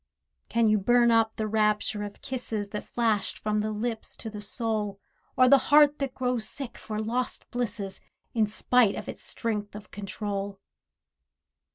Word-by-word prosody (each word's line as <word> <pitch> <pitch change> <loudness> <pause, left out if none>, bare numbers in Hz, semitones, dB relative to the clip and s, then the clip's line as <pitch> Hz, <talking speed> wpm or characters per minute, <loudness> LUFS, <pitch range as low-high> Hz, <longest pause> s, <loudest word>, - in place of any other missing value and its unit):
Can 230 0 +3
you 215 0 +4
burn 240 +3 +4
up 225 -1 +3
the 220 - -2
rapture 210 -1 +1
of 205 -1 -7
kisses 230 -6 -3
That 210 0 -4
flashed 215 -5 0
from 210 0 0
the 215 +1 0
lips 220 +1 -3
to 220 - -6
the 210 -1 -7
soul, 210 -2 -2 0.4
Or 255 - +7
the 275 +1 +7
heart 295 0 +6
that 275 -2 -2
grows 250 -4 -1
sick 275 -4 -6
for 215 -1 -6
lost 235 +4 -2
blisses 210 -5 -3 0.3
In 220 -2 +3
spite 220 +1 +3
of - - -6
its - - -6
strength 210 -4 -3
of 205 -2 -10
control? 200 -1 -4
220 Hz, 165 wpm, -28 LUFS, 210-240 Hz, 0.4 s, Or